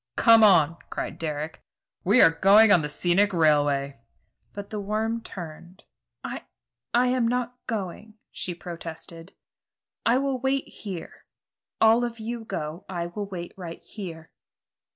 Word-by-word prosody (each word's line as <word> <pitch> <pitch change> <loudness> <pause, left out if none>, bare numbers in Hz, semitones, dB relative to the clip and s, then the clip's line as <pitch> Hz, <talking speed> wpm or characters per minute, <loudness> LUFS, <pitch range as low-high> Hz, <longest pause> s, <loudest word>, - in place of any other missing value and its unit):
"Come 230 -2 +6
on!" 165 -6 +5
cried - - -5
Dick. 155 0 -4 0.4
"We 210 +7 +5
are 165 - +7
going 200 +6 +6
on 175 - +6
the 150 - -3
scenic 175 +6 +2
railway." 145 -5 +2 0.5
But 200 0 -8
the 215 - -3
worm 220 +3 -2
turned. 175 0 -10 0.4
"I - - -6 0.5
I'm 250 0 +2
not 250 0 -1
going," 210 0 -5 0.2
she 175 - -5
protested. 165 0 -9 0.7
"I 235 +2 +3
will 270 -1 -1
wait 265 +2 0
here. 190 -6 -9 0.5
All 225 +2 +5
of 235 -1 -3
you 230 +1 -5
go; 155 -2 -5
I 175 -2 -3
will 205 -1 -4
wait 175 -3 -7
right 175 -3 -8
here." 165 -6 -9
195 Hz, 135 wpm, -26 LUFS, 165-225 Hz, 0.7 s, are